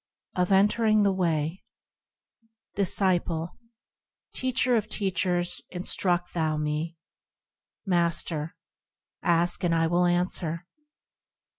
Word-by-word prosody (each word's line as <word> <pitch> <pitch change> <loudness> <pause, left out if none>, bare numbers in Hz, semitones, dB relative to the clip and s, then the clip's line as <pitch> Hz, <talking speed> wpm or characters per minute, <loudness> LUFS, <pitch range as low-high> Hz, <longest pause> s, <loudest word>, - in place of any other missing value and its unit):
2. 180 - +1
Of 180 - 0
Entering 215 +2 +4
the 200 - +3
Way 165 -2 -1 1.1
Disciple. 175 -4 +1 0.7
Teacher 255 -1 +1
of 215 -2 0
teachers, 180 -3 0
instruct 180 -1 -1
thou 155 -2 0
me. 150 +2 -3 0.9
Master. 170 -3 0 0.7
Ask, 170 +1 +1
and 170 -1 +2
I 165 0 +2
will 175 +2 +2
answer. 175 -1 -1
175 Hz, 95 wpm, -27 LUFS, 165-190 Hz, 1.1 s, Entering